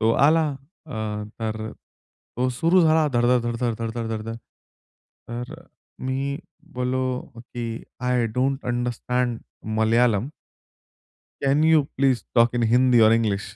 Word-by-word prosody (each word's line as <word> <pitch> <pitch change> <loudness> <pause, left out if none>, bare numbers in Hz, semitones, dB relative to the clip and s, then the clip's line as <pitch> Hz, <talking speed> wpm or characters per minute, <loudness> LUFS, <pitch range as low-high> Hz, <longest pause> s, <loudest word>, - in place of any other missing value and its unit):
तो 110 0 +3 0.2
आला. 160 +1 +4 0.4
अ, 140 - -8 0.5
तर 110 0 -3 0.7
तो 125 +2 +1
सुरू 165 +9 +3
झाला 160 -1 +4
धड, 120 -1 +2
धड, 125 -1 +3
धड, 120 0 -2
धड, 120 -2 0
धड, 115 -1 -3
धड, 115 -1 -2
धड, 110 -1 -3
धड. 115 - -4 0.9
तर 120 +4 -5 0.5
मी 135 +2 -2 0.4
बोललो 125 0 -1 0.3
की 115 -1 -4 0.2
I 125 -1 +1
don't 135 +2 0
understand 120 0 -1 0.4
Malayalam. 115 +1 +3 1.2
Can 140 +2 +3
you 160 -1 +5
please 135 -3 +2
talk 120 0 +4
in 120 - +1
Hindi 125 -1 +5
or 110 -1 +7
English? 110 -4 +1
125 Hz, 135 wpm, -24 LUFS, 115-130 Hz, 1.2 s, or